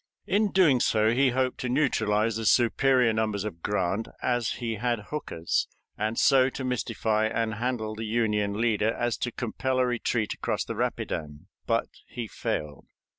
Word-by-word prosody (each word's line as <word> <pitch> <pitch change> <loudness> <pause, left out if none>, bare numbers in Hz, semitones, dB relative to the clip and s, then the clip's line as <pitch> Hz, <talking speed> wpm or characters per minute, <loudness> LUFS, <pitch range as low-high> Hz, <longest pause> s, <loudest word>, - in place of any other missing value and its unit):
In 205 +2 +2
doing 160 -9 +5
so 110 -1 +3
he 130 +3 +3
hoped 130 0 0
to 125 - -2
neutralize 115 -5 +1
the 110 -1 -1
superior 125 0 +4
numbers 110 -2 -1
of 90 -6 -6
Grant 100 +2 -1
as 120 -3 0
he 115 -2 -4
had 120 +1 0
Hooker's, 85 - -1 0.3
and 110 +2 -2
so 135 -2 +5
to 130 - -6
mystify 110 -3 0
and 110 0 -1
handle 110 -1 -2
the 110 +1 -5
Union 105 -2 0
leader 110 -2 +2
as 120 -1 0
to 125 - -2
compel 130 +2 -2
a 130 - +3
retreat 120 -3 -1
across - - -2
the - - -4
Rapidan. 75 +1 -3 0.2
But 115 -1 +1 0.2
he 120 -2 -6
failed. 75 -8 -4
115 Hz, 165 wpm, -27 LUFS, 105-125 Hz, 0.3 s, doing